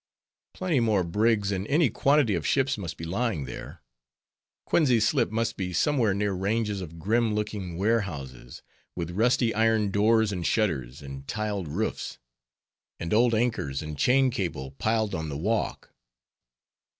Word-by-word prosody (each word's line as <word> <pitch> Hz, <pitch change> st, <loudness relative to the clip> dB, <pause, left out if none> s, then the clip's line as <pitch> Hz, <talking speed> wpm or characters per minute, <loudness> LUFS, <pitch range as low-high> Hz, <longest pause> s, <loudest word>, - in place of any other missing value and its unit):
_ -, -, -65 dB
Plenty 180 Hz, -7 st, +1 dB
more 110 Hz, -5 st, +2 dB
brigs 105 Hz, +3 st, +1 dB
and 95 Hz, +1 st, -2 dB
any 150 Hz, -4 st, +3 dB
quantity 140 Hz, -3 st, +3 dB
of 85 Hz, -4 st, -1 dB
ships 135 Hz, -1 st, +2 dB
must 95 Hz, -6 st, -6 dB
be -, -, -8 dB
lying 95 Hz, -, -1 dB
there. -, -, -9 dB, 0.8 s
Coenties 125 Hz, -9 st, +3 dB
Slip 135 Hz, -6 st, +1 dB
must 115 Hz, +1 st, -1 dB
be 90 Hz, -2 st, -3 dB
somewhere 115 Hz, -, +2 dB
near 100 Hz, 0 st, 0 dB
ranges 105 Hz, +2 st, -1 dB
of 85 Hz, -2 st, -8 dB
grim 110 Hz, +5 st, +1 dB
looking 105 Hz, -5 st, -3 dB
warehouses, 85 Hz, -, -2 dB, 0.3 s
with 85 Hz, -1 st, -4 dB
rusty 115 Hz, +4 st, +2 dB
iron 110 Hz, -2 st, +2 dB
doors 110 Hz, +1 st, +3 dB
and 90 Hz, -3 st, -3 dB
shutters, 75 Hz, -, -1 dB
and 70 Hz, 0 st, -9 dB
tiled 105 Hz, -5 st, -2 dB
roofs; 95 Hz, +10 st, -3 dB, 0.8 s
and 85 Hz, -, -3 dB
old 115 Hz, +1 st, +4 dB
anchors 110 Hz, -, -1 dB
and 75 Hz, 0 st, -6 dB
chain 130 Hz, -, +3 dB
cable 80 Hz, -, -3 dB
piled 110 Hz, +8 st, 0 dB
on 80 Hz, -1 st, -3 dB
the 70 Hz, -, -4 dB
walk. 105 Hz, +7 st, -2 dB
105 Hz, 150 wpm, -27 LUFS, 85-115 Hz, 0.8 s, old